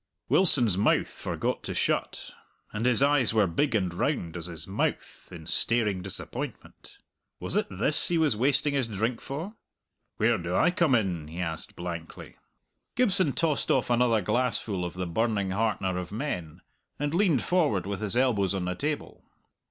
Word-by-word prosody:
Wilson's 120 - +4
mouth - - +2
forgot - - -3
to - - -5
shut, - - -1 0.4
and 115 +4 0
his 125 +1 +4
eyes 140 -5 +3
were 105 -2 +5
big 115 - 0
and 95 -5 0
round 90 - -1
as 85 0 -2
his 85 -3 -5
mouth 95 - -3
in 85 -3 -9
staring 105 +1 0
disappointment. 95 +1 -7 0.4
Was - - -4
it - - +1
this 105 +10 +1
he 175 - +1
was 155 -8 +2
wasting 140 +5 +2
his 135 -4 0
drink 110 +3 -2
for? 160 +10 -5 0.6
"Where - - +2
do - - -3
I 180 - +4
come 170 -7 +3
in?" 90 -9 -1
he 80 +3 -8
asked 80 -3 -4
blankly. 85 -2 -7 0.6
Gibson 195 - +3
tossed 155 +1 0
off 125 -2 +2
another 120 -2 +3
glassful 105 -2 0
of 85 - -6
the 90 0 -3
burning 100 +2 0
heartener 95 -3 0
of 90 0 -6
men, 90 - -4 0.4
and 145 +1 -2
leaned 170 - +3
forward 150 - +1
with 100 +1 -4
his 105 +2 -1
elbows 105 -7 +2
on 95 -2 -2
the 90 - -1
table. 145 +10 -4
110 Hz, 165 wpm, -28 LUFS, 90-140 Hz, 0.6 s, were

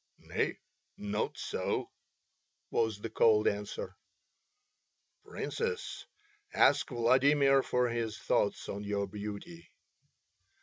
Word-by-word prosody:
"Nay, - - -2 0.4
not 105 +1 -2
so," - - -2 0.8
was 110 -3 +1
the 115 - -4
cold 110 -1 +4
answer. 105 0 -3 1.3
"Princess, 465 -1 -4 0.5
ask 145 +2 +4
Vladimir 135 +3 +4
for 125 -1 +1
his 115 -2 -2
thoughts - - 0
on 100 +1 -5
your 100 0 -1
beauty." 100 -4 -8
110 Hz, 90 wpm, -32 LUFS, 105-130 Hz, 1.3 s, cold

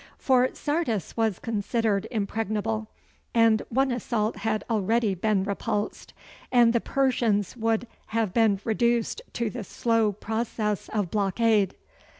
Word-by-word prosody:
For 255 -1 +3
Sardis 290 - -2
was 220 -5 +1
considered 220 -2 -1
impregnable 220 0 -2 0.5
and 225 -2 +5
one 265 +2 +2
assault 225 -3 -1
had 215 0 -1
already 225 0 +1
been 195 +1 +1
repulsed, 205 +1 -3 0.4
and 240 -2 +5
the 235 - +2
Persians 235 -7 +1
would 225 0 0 0.2
have 220 -4 -1
been 220 -4 +3
reduced 235 - +1
to 235 -3 -1
the 240 -3 -5
slow 225 +1 +1
process 215 0 -2
of 205 -5 -2
blockade. 210 -1 +2
220 Hz, 125 wpm, -26 LUFS, 210-235 Hz, 0.5 s, and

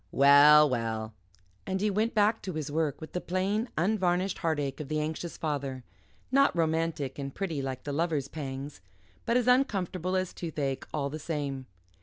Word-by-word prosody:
Well, 145 +2 +7
well," 115 -4 -2 0.5
and 190 - -1
he 210 +1 +1
went 220 +4 0
back 215 +1 +3
to 185 - -5
his 155 -2 -4
work 155 -2 -1
with 155 - -10
the 180 - -2
plain 195 +6 -1
unvarnished 185 0 +1
heartache 145 -5 -1
of 150 - -5
the 155 +1 -1
anxious 160 +2 -4
father 140 -4 -3 0.5
not 275 -4 +4
romantic 160 -4 -1
and 140 0 -4
pretty 170 -7 -2
like 130 -1 -4
the 145 - -4
lover's 155 -3 0
pangs, 135 -6 -6 0.5
but 235 +1 +3
as 250 - +1
uncomfortable 190 - +1
as 185 -1 -1
toothache, 145 -5 -3
all 140 -2 -2
the 155 - -5
same. 140 -4 -4
155 Hz, 170 wpm, -29 LUFS, 140-185 Hz, 0.5 s, Well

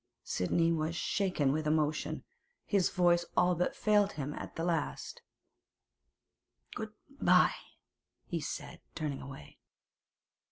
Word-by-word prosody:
Sidney 165 - +1
was 160 0 0
shaken 180 -7 +1
with 155 +1 -1
emotion; 155 0 0 0.4
his 195 -4 +2
voice 175 -2 +3
all 180 0 +5
but 175 +1 0
failed 210 -2 +3
him 145 -1 -4
at - - -7
the 165 - -2
last. 165 -3 -2 1.5
'Good - - -5 0.3
bye,' - - +6 0.7
he - - -2
said, - - -6
turning 145 -3 -3
away. 135 0 -10
165 Hz, 115 wpm, -32 LUFS, 150-180 Hz, 1.5 s, bye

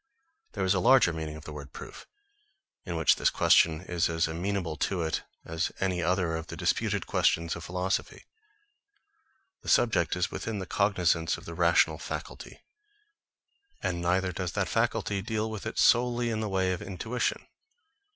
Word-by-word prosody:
There - - -1
is 95 - +3
a 95 - +1
larger 125 -4 +5
meaning 80 -1 -5
of 80 - -10
the 75 - -7
word 70 -2 -9
proof, - - -10 0.8
in 85 -4 -4
which 80 -2 +4
this - - +3
question 80 -1 +4
is 90 -2 -1
as 80 0 +1
amenable 85 0 -2
to 90 +2 -1
it 80 - -1 0.2
as 80 +2 -2
any 95 -2 0
other 90 -1 +1
of 80 0 -5
the - - -8
disputed - - 0
questions 85 0 +1
of 85 - -8
philosophy. 90 +2 -2 1.4
The - - -6
subject 90 -10 +3
is 90 - -1
within 110 -1 -4
the 95 - -4
cognisance 90 -4 +1
of - - -13
the 85 - -7
rational 85 -2 +3
faculty; 80 - -7 1.2
and 85 -1 -1
neither 90 +2 +1
does 90 -1 -4
that - - 0
faculty 100 -1 0
deal 110 +1 -2
with 110 0 -5
it 110 - -6
solely 120 -1 +3
in 110 - -2
the 110 -1 -2
way 95 -1 +1
of 90 - -5
intuition. 105 +5 -3
90 Hz, 170 wpm, -28 LUFS, 80-100 Hz, 1.4 s, larger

